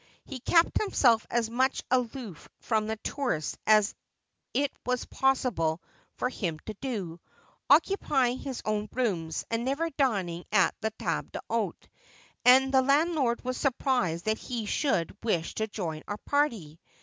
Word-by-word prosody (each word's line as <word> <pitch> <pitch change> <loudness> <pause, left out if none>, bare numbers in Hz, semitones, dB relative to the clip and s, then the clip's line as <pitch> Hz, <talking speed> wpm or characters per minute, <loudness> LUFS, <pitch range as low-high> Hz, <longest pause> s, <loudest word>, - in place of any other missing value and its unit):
He 270 -3 -7
kept 335 +7 +3
himself 245 - +3
as 235 -1 +1
much 255 +3 0
aloof 245 - -2
from 215 -2 0
the 220 - -1
tourists 245 - -2
as 215 -1 +5 0.6
it 280 +1 +1
was 250 0 -1
possible 245 -12 +1 0.4
for - - -1
him 180 -10 -3
to 215 - -5
do, 200 -11 -4 0.5
occupying 265 -10 +3
his 265 -3 -6
own 210 -1 -1
rooms, 175 -11 -1
and 230 +1 0
never 290 +6 -1
dining 195 - 0
at 200 -3 +4
the 220 - 0
table - - -2
d'hdte; - - -3 0.6
and 265 +2 +6
the 265 - +6
landlord 280 -2 +2
was 255 0 -2
surprised 245 - 0
that 220 0 0
he 235 -3 -4
should 200 - 0
wish 175 -8 -1
to 220 - -2
join 170 -7 -4
our 205 - -3
party. 220 - -1
235 Hz, 145 wpm, -28 LUFS, 200-265 Hz, 0.6 s, and